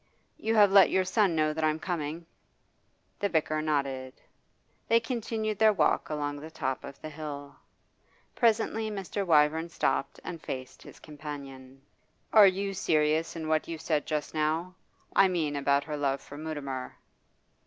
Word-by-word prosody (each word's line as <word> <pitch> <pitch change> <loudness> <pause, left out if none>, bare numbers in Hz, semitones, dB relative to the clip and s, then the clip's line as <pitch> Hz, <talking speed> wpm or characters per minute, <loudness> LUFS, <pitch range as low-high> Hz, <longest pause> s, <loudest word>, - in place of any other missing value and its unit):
You 225 +1 0
have 205 -2 +6
let 195 -1 +7
your 190 0 +2
son 190 -2 +2
know 155 -1 +2
that 160 +1 -3
I 155 - +4
am 155 - -1
coming?' 165 -1 -4 0.9
The 200 - 0
vicar 155 -2 0
nodded. 135 -4 -1 0.7
They 230 - +5
continued 225 -3 -3
their 220 -1 +6
walk 195 - +1
along 145 -1 -2
the 155 +2 -9
top 130 -4 -3
of 140 0 -9
the 155 - -5
hill. 145 -2 -7 0.8
Presently 225 -1 +1
Mr. 200 -1 -3
Wyvern 160 -1 +3
stopped 150 - -1
and 170 -3 -6
faced 130 -1 -7
his - - -13
companion. 140 -3 -9 0.5
'Are 210 -2 +9
you 195 +1 0
serious 155 -3 +1
in 160 -1 -5
what 155 0 +1
you 165 - -4
said 155 -1 -1
just 150 -2 -2
now? 160 +4 -1 0.4
I 195 - +7
mean 160 -5 -1
about 140 0 +2
her 150 0 -5
love 140 -1 0
for 145 - -12
Mutimer? 145 -4 -5
155 Hz, 160 wpm, -29 LUFS, 145-190 Hz, 0.9 s, Are